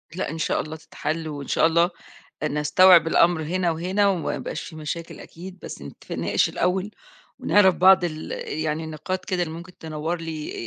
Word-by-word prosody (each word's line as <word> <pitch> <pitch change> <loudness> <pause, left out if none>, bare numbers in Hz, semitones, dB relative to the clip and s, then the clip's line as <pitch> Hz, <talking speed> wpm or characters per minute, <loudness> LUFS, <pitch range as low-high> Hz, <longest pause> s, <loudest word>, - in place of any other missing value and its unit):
لأ 185 - -2
إن 160 - -5
شاء 160 - 0
الله 155 +1 -7
تتحل، 160 0 -4
وإن 145 -3 -6
شاء - - +3
الله 170 +2 +3 0.6
نستوعب 155 +4 +5
الأمر 170 0 +3
هنا 175 +3 0
وهنا 185 +5 +1
وما 180 -5 -1
يبقاش - - -5
في 160 - -10
مشاكل 155 +2 -6
أكيد، 185 +3 -11
بس - - -8
نتفق 70 - -9
نناقش - - +1
الأول 190 +3 -1 0.5
ونعرف 190 -3 +4
بعض 185 +1 +6
ال 155 -2 -4 0.3
يعني 155 0 -2
النقاط 185 +4 -4
كده 185 -2 -1
اللي 160 -2 -4
ممكن 175 +2 -11
تنوّر 160 +2 -4
لي 160 -2 -5
165 Hz, 175 wpm, -24 LUFS, 155-185 Hz, 0.6 s, بعض